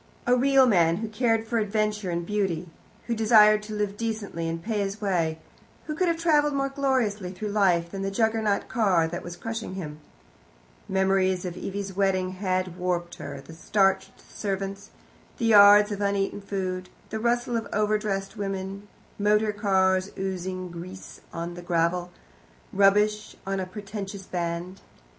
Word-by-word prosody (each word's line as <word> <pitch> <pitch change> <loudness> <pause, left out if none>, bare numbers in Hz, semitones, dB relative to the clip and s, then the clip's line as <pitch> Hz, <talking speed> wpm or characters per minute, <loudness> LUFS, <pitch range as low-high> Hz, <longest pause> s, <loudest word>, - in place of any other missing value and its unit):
A 245 - +4
real 270 +1 +5
man, 170 -8 +4
who 225 - -3
cared 225 0 +1
for 230 0 0
adventure 210 -2 -1
and 170 0 -2
beauty, 190 -4 -1 0.4
who 235 - -1
desired 215 -1 +6
to 210 0 -7
live 205 -1 -2
decently 210 -7 -3
and 165 0 -3
pay 215 +4 -2
his 200 +1 -2
way, 170 -6 0 0.5
who 305 - -3
could 360 +4 0
have 335 -1 +1
travelled 300 -3 +3
more 275 0 0
gloriously 255 -9 0
through 205 +3 -5
life 180 -5 +2
than 195 - -5
the 195 - -1
Juggernaut 220 0 +1
car 190 -9 +2
that 175 +1 -5
was 175 0 -7
crushing 225 -1 -5
him. 155 -5 -6 0.9
Memories 190 -1 +2
of 175 -1 -4
Evie's 195 +1 -5
wedding 185 -2 +1
had 185 -2 -2
warped 175 -1 -2
her, - - -7
the 165 - -13
starched 195 +2 +1
servants, 195 -1 -4 0.5
the 235 - -1
yards 205 -1 +8
of 205 0 -3
uneaten 200 0 0
food, 185 -2 -4 0.2
the 220 - -2
rustle 240 +1 0
of 225 -2 -2
overdressed 210 -1 0
women, 195 0 -4 0.3
motor 210 +1 +3
cars 190 -2 +2
oozing 185 -1 -4
grease 180 +2 -9
on 170 +1 -5
the 175 - -8
gravel, 175 +1 0 0.6
rubbish 210 +2 +3
on 195 0 -2
a 185 - -3
pretentious 195 0 -7
band. 175 +1 -4
195 Hz, 155 wpm, -26 LUFS, 185-215 Hz, 0.9 s, yards